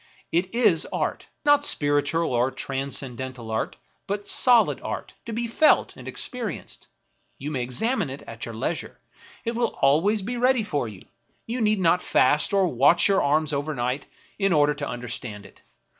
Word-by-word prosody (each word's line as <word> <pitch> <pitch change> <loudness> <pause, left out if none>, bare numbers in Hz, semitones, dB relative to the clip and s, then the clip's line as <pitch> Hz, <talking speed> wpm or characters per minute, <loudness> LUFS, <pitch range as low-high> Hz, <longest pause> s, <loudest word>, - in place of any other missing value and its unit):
It 180 +5 0
is 215 -9 +3
art; - - -2 0.2
not 290 0 +5
spiritual 145 - +1
or 120 +2 +2
transcendental 130 -3 -4
art, 110 - -2 0.3
but 200 +1 -3
solid 245 -3 +4
art, - - -5
to - - -4
be 235 +2 -2
felt 305 +7 +3
and - - -11
experienced. 235 -8 -6 0.5
You 145 +3 -5
may 135 -4 -2
examine 185 - -1
it 135 +2 -8
at 115 0 -9
your 115 - -7
leisure, 135 +8 -4 0.5
it 230 - -1
will 240 +1 +1
be - - -18
always 190 +10 +3
ready 245 +1 +2
for 145 - -2
you; 105 -4 -10 0.4
you 240 +2 -3
need 215 -1 +2
not 180 0 +3
fast 145 +4 +2
or 195 -2 +3
watch 145 +4 +4
your 195 -1 +3
arms 150 +1 +1
overnight 140 -2 -2 0.3
in 195 -2 +2
order 150 -1 +4
to 145 0 -5
under 120 0 -6
stand 105 -4 -5
it. - - -17
155 Hz, 170 wpm, -25 LUFS, 130-210 Hz, 0.5 s, not